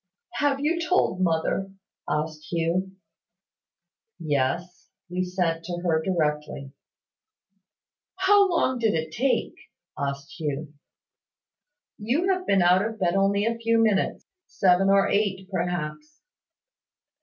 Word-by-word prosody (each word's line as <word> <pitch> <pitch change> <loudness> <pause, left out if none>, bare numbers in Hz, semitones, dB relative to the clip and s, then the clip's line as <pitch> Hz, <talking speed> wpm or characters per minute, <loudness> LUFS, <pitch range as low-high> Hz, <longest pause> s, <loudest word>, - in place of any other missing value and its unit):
"Have 285 -2 +2
you 330 +4 0
told 315 - +1
mother?" 180 +3 0 0.4
asked 155 0 -3
Hugh. 175 +3 -1 1.2
"Yes; 165 +3 -2 0.2
we 180 +1 -1
sent 180 -3 -1
to 175 0 -4
her 160 -2 +2
directly." 150 -5 -2 1.4
"How 390 +1 +4
long 260 -7 +1
did 225 -5 +2
it 160 0 -2
take?" 260 +10 0 0.4
asked 140 +2 -4
Hugh. 150 -1 -4 1.3
"You 295 - +1
have 370 0 -5
been 195 -2 +4
out 180 +2 +4
of 225 0 -4
bed 175 -2 +1
only 200 +1 +2
a 230 0 -1
few 230 0 +2
minutes 215 -4 +1 0.2
seven 190 0 +3
or 195 0 +4
eight, 195 -2 0
perhaps." 180 - -4
185 Hz, 115 wpm, -25 LUFS, 165-225 Hz, 1.4 s, How